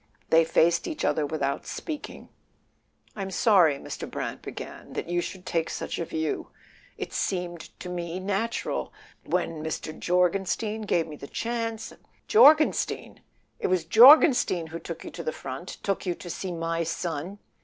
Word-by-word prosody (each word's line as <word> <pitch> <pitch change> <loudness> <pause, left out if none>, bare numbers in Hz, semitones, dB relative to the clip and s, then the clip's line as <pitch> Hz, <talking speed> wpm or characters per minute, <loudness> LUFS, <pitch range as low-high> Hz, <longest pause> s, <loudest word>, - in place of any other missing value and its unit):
They 165 0 +7
faced 170 +1 +3
each 315 - -3
other 150 -2 +1
without 140 -2 -2
speaking. 305 -3 -6 0.9
"I'm 195 -2 -4
sorry," 180 -7 +4
Mr. - - -7
Brant - - -4
began, - - -8
"that - - -4
you 175 0 0
should 185 +1 -7
take 165 -2 -1
such - - -4
a 170 - -1
view. 160 -2 -3 0.5
It - - -6
seemed 180 -2 -2 0.2
to - - -7
me 175 0 -4
natural..., 200 +4 -2 0.3
when 155 -2 -2
Mr. 155 0 -4
Jorgenstein 195 +4 0
gave 170 -4 +2
me 150 -2 -9
the 140 - -9
chance 230 +1 -3
" - - -39
" - - -39
Jorgenstein! 315 -8 +4 0.4
It - - 0
was 180 -3 +1
Jorgenstein 240 - +7
who 160 +1 -7
took 170 -1 -7
you - - -8
to 170 - -7
the 155 - -1
front? 135 +6 -7
Took 195 -1 -1
you 175 - 0
to 175 - -8
see 185 +2 -4
my 165 0 -2
son?" 165 +2 -3
175 Hz, 165 wpm, -27 LUFS, 165-200 Hz, 0.9 s, They